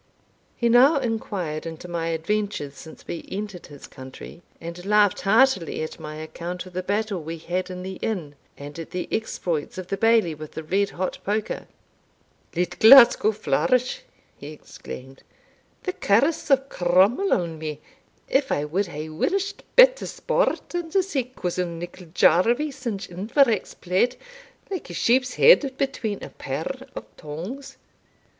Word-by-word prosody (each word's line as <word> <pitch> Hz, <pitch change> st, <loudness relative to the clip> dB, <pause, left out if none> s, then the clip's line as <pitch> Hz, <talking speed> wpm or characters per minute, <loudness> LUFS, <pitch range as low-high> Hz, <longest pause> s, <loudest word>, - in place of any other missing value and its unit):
He 235 Hz, -, 0 dB
now 255 Hz, +6 st, +6 dB
inquired 200 Hz, -, -3 dB
into 165 Hz, +2 st, -8 dB
my 170 Hz, -1 st, -3 dB
adventures 165 Hz, -2 st, -2 dB
since 155 Hz, +3 st, -13 dB
we 170 Hz, -, -6 dB
entered 200 Hz, -2 st, -6 dB
his 145 Hz, -2 st, -12 dB
country, 130 Hz, +6 st, -11 dB, 0.2 s
and 170 Hz, +1 st, -8 dB
laughed 205 Hz, 0 st, +3 dB
heartily 215 Hz, -6 st, +3 dB
at 155 Hz, -, -7 dB
my 155 Hz, 0 st, -7 dB
account 170 Hz, +3 st, -6 dB
of 185 Hz, -, -13 dB
the 185 Hz, -, -2 dB
battle 200 Hz, 0 st, -1 dB
we 165 Hz, +2 st, -6 dB
had 180 Hz, +3 st, -3 dB
in 180 Hz, 0 st, -6 dB
the 190 Hz, 0 st, -6 dB
inn, 175 Hz, -10 st, -3 dB, 0.2 s
and 145 Hz, +3 st, -9 dB
at 165 Hz, -, -7 dB
the 180 Hz, -, -4 dB
exploits 175 Hz, -9 st, -2 dB
of 185 Hz, -1 st, -7 dB
the 195 Hz, -, -1 dB
Bailie 225 Hz, -5 st, +3 dB
with 155 Hz, 0 st, -10 dB
the 160 Hz, -, -6 dB
red 195 Hz, +5 st, +1 dB
hot 185 Hz, +1 st, -4 dB
poker. 210 Hz, +1 st, -2 dB, 0.9 s
"Let 180 Hz, +1 st, -2 dB
Glasgow 235 Hz, -2 st, +8 dB
Flourish!" 215 Hz, -, 0 dB, 0.3 s
he 145 Hz, -, -10 dB
exclaimed. 135 Hz, -3 st, -10 dB, 0.6 s
"The 370 Hz, -, -2 dB
curse 280 Hz, -, +1 dB
of 270 Hz, -1 st, +3 dB
Cromwell 190 Hz, -, +2 dB
on 165 Hz, -3 st, 0 dB
me, 155 Hz, -2 st, -5 dB, 0.5 s
if 270 Hz, 0 st, +1 dB
I 145 Hz, -, 0 dB
wad 185 Hz, +7 st, -1 dB
hae 155 Hz, -2 st, -6 dB
wished 385 Hz, -, -2 dB
better -, -, +6 dB
sport -, -, -1 dB
than 345 Hz, -2 st, -4 dB
to 380 Hz, +3 st, +2 dB
see 285 Hz, -10 st, -2 dB
cousin 180 Hz, -8 st, -3 dB
Nicol 175 Hz, +1 st, -9 dB
Jarvie 235 Hz, -, +3 dB
singe 240 Hz, -7 st, -5 dB
Iverach's 215 Hz, +4 st, +1 dB
plaid, 185 Hz, +8 st, +1 dB, 0.6 s
like 370 Hz, -, -5 dB
a 175 Hz, -, -7 dB
sheep's 250 Hz, +4 st, +2 dB
head 280 Hz, -, +5 dB
between 235 Hz, -7 st, -2 dB
a -, -, -7 dB
pair 250 Hz, -, -5 dB
of -, -, -6 dB
tongs. 200 Hz, -, -7 dB
190 Hz, 155 wpm, -24 LUFS, 165-245 Hz, 0.9 s, Glasgow